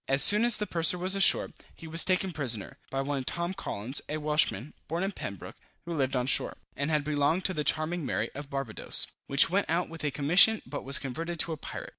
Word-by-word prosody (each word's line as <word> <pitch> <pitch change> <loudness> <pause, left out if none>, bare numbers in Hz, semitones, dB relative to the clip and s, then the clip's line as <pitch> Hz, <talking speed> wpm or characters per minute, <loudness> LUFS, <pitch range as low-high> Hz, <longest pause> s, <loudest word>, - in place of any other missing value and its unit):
As 135 +1 +6
soon 210 +2 +6
as 240 -2 +8
the 210 - -2
purser 170 -1 0
was 185 +2 -1
ashore, 195 -1 +4 0.2
he - - -13
was 165 +1 +5
taken 185 0 0
prisoner, 120 - -1
by 135 - -2
one 140 -1 -3
Tom 170 +6 -3
Collins, 130 - -3
a 155 - -3
Welshman, 150 -5 0
born 170 +4 -3
in 195 - -2
Pembroke, 100 - -8 0.3
who 170 - -5
lived 135 -4 -1
on 125 -1 0
shore, 135 - +2 0.2
and 140 +2 -3
had 150 -2 0
belonged 150 +4 0
to 185 - +1
the 150 - -3
Charming 155 +3 -1
Mary, 130 - -3
of 145 0 -9
Barbadoes, 135 -6 -1 0.2
which 140 +4 +3
went 200 +2 0
out 170 +2 -1
with 165 -1 -9
a 150 - 0
commission 175 +11 +4
but 145 - -7
was 135 +1 +1
converted 165 +6 -6
to 170 - -3
a - - -7
pirate. - - -8
155 Hz, 225 wpm, -28 LUFS, 140-175 Hz, 0.3 s, as